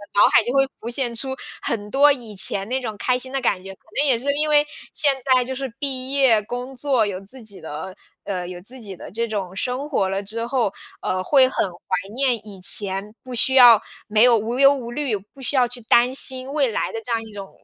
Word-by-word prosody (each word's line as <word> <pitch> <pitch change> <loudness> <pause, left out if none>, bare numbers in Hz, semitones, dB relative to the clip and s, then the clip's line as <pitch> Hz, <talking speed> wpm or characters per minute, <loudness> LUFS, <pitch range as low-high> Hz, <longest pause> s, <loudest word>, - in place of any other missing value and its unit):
脑 205 - +5
海 - - +6
就 240 - -3
会 270 0 +4
浮 230 - -6
现 240 -1 -1
出 265 +3 -2 0.3
很 210 -2 -3
多 285 +2 +6
以 235 -6 -9
前 195 +1 +1
那 260 - 0
种 225 -5 -5
开 250 +3 0
心 260 +1 -4
的 270 - -1
感 185 -6 0
觉。 195 0 -9
可 - - -50 0.2
能 295 - +3
也 255 - +3
是 280 +4 0
因 305 +1 0
为 295 0 +4 0.3
现 285 -3 +4 0.2
在 250 - +3
就 260 +1 -5
是 270 +1 -4
毕 265 -2 -2
业 265 -6 +4
工 245 +4 -6
作， 255 -4 +1
有 190 -2 -4
自 250 +7 -9
己 200 -3 -6
的 160 +4 -7 0.3
呃， 180 -3 -4
有 180 -1 -7
自 250 +7 -6
己 200 -5 -7
的 - - -10
这 230 +3 -2
种 195 -4 -4
生 255 +7 -3
活 200 -10 +1
了 195 +1 -2
之 225 +3 -4
后， 240 -5 0 0.3
呃， 185 0 -2
会 265 +3 +5
很 - - 0
怀 185 +3 -4
念 260 -2 +2
以 195 -2 -10
前 195 +2 +1
不 255 -1 -9
需 260 +2 +3
要 240 -4 +8 0.3
没 215 0 +2
有 240 -2 +6
无 230 +4 -3
忧 275 0 +7
无 240 -4 -6
虑， 270 -3 -1
不 210 +7 -17
需 270 +2 -1
要 250 -2 +4
去 245 0 -6
担 240 +3 +3
心 260 0 +1
未 285 -2 +2
来 - - -2
的 225 - -4
这 240 - -7
样 225 -1 0
一 220 - -12
种 195 -1 -8
240 Hz, 260 characters per minute, -22 LUFS, 205-265 Hz, 0.3 s, 要